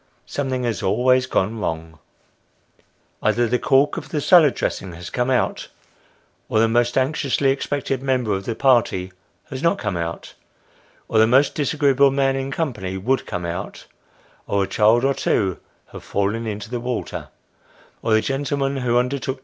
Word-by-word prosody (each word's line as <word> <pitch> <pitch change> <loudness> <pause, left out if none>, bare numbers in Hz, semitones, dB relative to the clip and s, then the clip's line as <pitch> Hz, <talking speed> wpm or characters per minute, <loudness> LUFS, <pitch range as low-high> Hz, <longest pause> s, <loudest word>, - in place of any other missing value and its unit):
Something 130 -3 -3
has 115 -3 -2
always 125 +5 +2
gone 110 -1 0
wrong. 80 -4 -4 1.2
Either 120 - +2
the 125 +2 0
cork 140 +1 +3
of - - -6
the 155 - -2
salad 155 -2 +5
dressing 95 -3 -3
has 85 +1 -9
come 125 +1 -1
out, 130 -2 0 0.8
or - - 0
the 115 - +4
most 120 +2 +1
anxiously 135 0 +1
expected 135 -1 -2
member 130 -5 0
of 95 0 -3
the 115 - -3
party 115 -8 +2 0.4
has 130 -1 -5
not 170 - +2
come 105 -4 -3
out, 85 0 -5 0.7
or 110 - +2
the 110 - +6
most 135 +4 +4
disagreeable 140 -2 +3
man 135 0 +1
in 135 0 -3
company 110 - -3
would 130 +8 -1
come 90 -3 -4
out, 85 +1 -6 0.6
or 100 -1 +1
a - - -3
child 115 +4 +3
or 140 - +3
two 95 -8 0 0.3
have - - -10
fallen 105 +3 -1
into 105 +1 -5
the 120 - -2
water, 125 0 -4 0.7
or 115 - -2
the 110 - +3
gentleman 140 +1 -1
who 120 -2 +1
undertook 125 - +3
72 140 - -2
Sketches - - -7
by 130 - 0
Boz. 130 - -18
125 Hz, 175 wpm, -21 LUFS, 105-135 Hz, 1.2 s, the